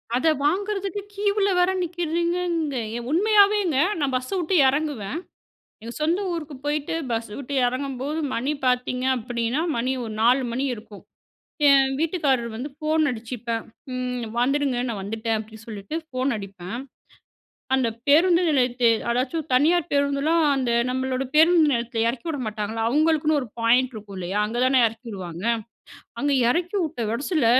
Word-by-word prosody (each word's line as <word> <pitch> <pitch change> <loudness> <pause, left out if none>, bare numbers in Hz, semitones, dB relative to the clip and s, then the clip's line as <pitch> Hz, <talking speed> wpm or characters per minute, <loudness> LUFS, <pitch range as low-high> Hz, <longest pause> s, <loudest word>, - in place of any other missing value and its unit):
அத 260 +6 +1 0.2
வாங்குறதுக்கு 395 +4 -1
கியூவ்ல 405 0 +1
வேற 360 +1 +4
நிக்கிறீங்கங்க 340 -2 -1 0.4
உண்மையாவேங்க 405 -2 +4 0.2
நான் 280 -3 0
பஸ்ஸ 255 0 -2
விட்டு 355 +2 0
எறங்குவேன், 280 -4 -1 0.7
எங்க 230 +1 -7
சொந்த 335 +5 +1
ஊருக்கு 310 -3 -5
போய்ட்டு 295 +1 -1 0.2
பஸ்ஸ 225 -1 -2
விட்டு 280 0 -5
எறங்கும்போது 270 +3 -3 0.2
மணி 260 +6 -1
பார்த்திங்க 250 0 0
அப்டின்னா, 235 +3 -2 0.2
மணி 250 +3 0
ஒரு 220 - -6
4 250 +4 +4
மணி 260 +3 -1
இருக்கும். 210 -2 -13 0.7
என் 270 -1 +5
வீட்டுக்காரர் 285 -8 0
வந்து 255 +6 -5
ஃபோன் 310 +1 +1
அடிச்சிப்பேன். 230 -1 -4 0.3
ம் 250 -2 -3
வந்துடுங்க, 275 +1 +1
நான் 220 -4 -3
வந்துட்டேன் 220 +3 -2
அப்டின்னு 220 0 -9
சொல்லிட்டு 215 +5 -7
ஃபோன் 255 -1 -1
அடிப்பேன். 195 +1 -7 1.0
அந்த 260 -2 +3 0.2
பேருந்து 340 +4 +5
நிலையத்த 250 -4 +1 0.2
அதாச்சும் 270 +6 -1
தனியார் 315 +5 +3
பேருந்துலாம் 285 +3 +2
அந்த 255 -3 0 0.2
நம்மளோட 260 0 -1
பேருந்து 325 +1 +6
நிலையத்துல 235 -1 -1
எறக்கி 240 +5 -5
விட 300 -3 -3
மாட்டாங்களா, 215 +1 -3
அவங்களுக்குன்னு 310 +2 +2
ஒரு 250 - -7
பாயிண்ட் 250 +3 +3
இருக்கும் 205 -2 -9
இல்லையா? 185 +3 -2
அங்க 225 +3 -4
தானே 260 -1 +4
எறக்கிவிடுவாங்க. 200 -6 -7 0.8
அங்க 285 0 +1 0.2
எறக்கி 355 +5 -2
விட்ட 310 -5 -5
வெரஸ்ல 290 +2 0
265 Hz, 135 wpm, -24 LUFS, 235-315 Hz, 1.0 s, பேருந்து